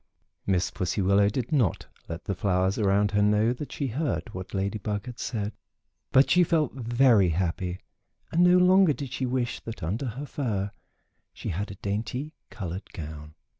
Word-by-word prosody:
Miss 95 -2 +1
Pussy 90 +3 -2
Willow 100 +1 +4
did 120 +3 -3
not 125 - +1 0.2
let 85 +2 -5
the 100 - -2
flowers 95 0 +1
around 100 0 +3
her 105 0 +2
know 105 +3 +3
that 140 +3 -7
she 140 - -3
heard 125 -3 -2
what 95 +2 -7
Lady 100 +3 -1
Bug 105 0 -3
had 125 -1 -8
said, 105 -3 -3 0.6
but 130 0 +5
she 180 +1 +6
felt 155 -5 +1
very 120 -5 +4
happy 90 +1 -1 0.5
and 170 +2 +4
no 180 0 +6
longer 180 -2 +6
did 135 -2 -6
she 130 - -1
wish 125 -1 -1
that 115 -6 -8
under 105 - -2
her 130 +6 -5
fur 105 -9 -2 0.6
she - - -6
had 100 +5 -3
a 100 - -7
dainty 115 +9 -3 0.2
colored 95 -1 -6
gown. 75 -3 -8
105 Hz, 175 wpm, -27 LUFS, 95-130 Hz, 0.6 s, she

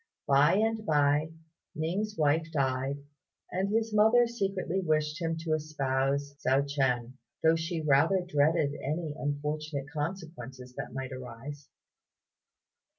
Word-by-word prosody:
By 145 +4 +5
and 220 +1 +1
by, 150 -3 +2 0.5
Ning's 190 +7 -2
wife 155 +2 +2
died, 135 -1 -1 0.5
and 190 +2 0
his 225 +1 0
mother 220 +3 +6
secretly 195 -5 -2
wished 155 -1 0
him 165 -1 -1
to 160 -1 -1
espouse 140 -2 -1
Hsiao 135 +2 +3
ch'ien, 130 -3 0 0.3
though 160 0 +5
she 165 0 -2
rather 155 +6 +3
dreaded 150 -1 +2
any 155 +2 -2
unfortunate 145 0 -3
consequences 145 -6 -5
that - - -6
might 130 -1 -4
arise. 130 +3 -8
150 Hz, 120 wpm, -30 LUFS, 140-170 Hz, 0.5 s, mother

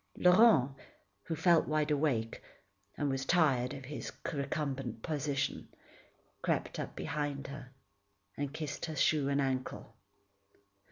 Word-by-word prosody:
Laurent, 180 - +6 0.5
who 165 - -2
felt 165 +1 +4
wide 155 0 +1
awake, 135 -7 0 0.6
and 145 - 0
was 135 -1 -1
tired 135 -6 +3
of 135 -2 -7
his 145 +3 -6 0.2
recumbent 135 -5 -3
position, 145 -3 -2 0.7
crept - - -1
up - - -5
behind 145 -3 -3
her 135 -2 -8 0.7
and 145 -1 -3
kissed 150 -1 -4
her 160 - -5
shoe 150 -2 +2
and 140 0 +1
ankle. 130 -2 -2
145 Hz, 120 wpm, -33 LUFS, 135-155 Hz, 0.7 s, Laurent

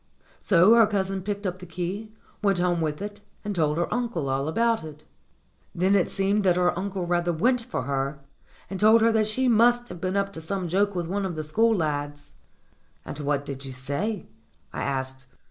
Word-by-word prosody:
So 185 +3 +5
her 230 -2 +6
cousin 195 -2 -1
picked 200 +1 -4
up 185 -1 -2
the 180 - -10
key, 185 +6 -4 0.3
went 200 -3 +2
home 175 -1 +1
with 155 +3 -2
it, 205 0 -7 0.2
and 205 - -2
told 155 -4 +1
her 170 - -1
uncle 230 - -2
all 135 +2 -1
about 230 +6 +1
it. 155 -1 -10 0.7
Then 185 +3 +2
it 190 - +2
seemed 200 +2 +1
that 180 -2 +4
her 180 0 +2
uncle 190 0 -3
rather 175 0 +1
went 240 +10 +2
for 180 - -4
her, 140 +1 -2 0.5
and 190 - -6
told 220 +2 +6
her 230 +1 +5
that 220 -1 +2
she 255 +5 0
must 240 +1 +4
have 175 -1 -9
been 185 +1 -1
up 200 0 -1
to 160 - -6
some 185 +2 -3
joke 200 +3 +1
with 175 -1 -1
one 195 +4 -2
of 185 -3 -3
the 155 - -3
school 225 +9 +2
lads. 145 -3 -3 0.7
"And - - -7
what 145 -1 -1
did 140 -1 -6
you 135 -1 -7
say?" 145 - -3 0.5
I - - -4
asked. 130 -1 -3
185 Hz, 205 wpm, -26 LUFS, 155-205 Hz, 0.7 s, her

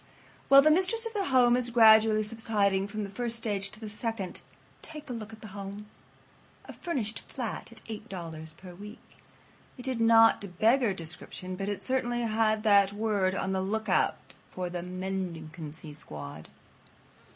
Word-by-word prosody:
While 275 0 +8
the 310 - +5
mistress 380 +8 +2
of 455 - -5
the 405 -2 -1
home 250 -5 +4
is 250 -1 0
gradually 220 -2 +6
subsiding 210 -3 +1
from 215 +1 -4
the 200 - -5
first 235 +2 -1
stage 205 -4 -2
to 215 - -13
the 220 - -7
second, 210 -2 -3 0.4
take 305 -2 -9
a 250 - -4
look 220 -2 -7
at 220 - -13
the 215 - -9
home. 200 +1 -7 0.8
A - - -9
furnished 240 - -3
flat 235 - -5
at 230 - -11
$8 170 -8 -8
per 185 -2 -11
week. 205 +4 -13 0.6
It 250 - -8
did 255 -3 -2
not 225 -1 +6
exactly 200 +2 -5
beggar 240 -4 +4
description, 175 +2 -5
but 195 +2 -3
it 205 - -4
certainly 240 -2 0
had 220 -1 +1
that 200 -2 +5
word 205 -3 0
on 190 - -2
the 190 0 0
lookout 220 +3 +1 0.3
for 180 -1 -4
the 175 -1 -4
mendicancy 170 -4 -6
squad. 75 - -9
215 Hz, 165 wpm, -29 LUFS, 190-230 Hz, 0.8 s, While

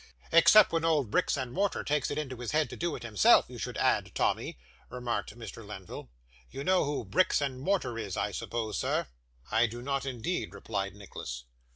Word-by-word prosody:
'Except 185 +5 +7
when 165 -1 0
old 150 -9 +2
bricks - - +2
and 130 -2 -4
mortar 200 +1 0
takes 145 -2 0
it 145 - -3
into 135 -4 -4
his 120 +3 -5
head 155 0 +1
to - - -6
do 170 -1 -2
it - - -8
himself, 105 -5 +5
you - - -10
should - - -4
add, - - +1
Tommy,' - - 0 0.3
remarked 120 -3 -3
Mr. 115 -1 -8
Lenville. 95 -10 -9 0.4
'You 135 - -6
know 185 +1 +3
who 145 0 -2
bricks 185 - +3
and 135 -3 -2
mortar 140 -7 -1
is, 100 -4 -4
I - - -1
suppose, 110 -3 -3
sir?' - - 0 0.5
'I 115 +2 +4
do 120 +2 -7
not, 140 0 -2
indeed,' 125 - -3
replied 100 0 -3
Nicholas. 60 -11 -7
125 Hz, 195 wpm, -30 LUFS, 110-150 Hz, 0.5 s, Except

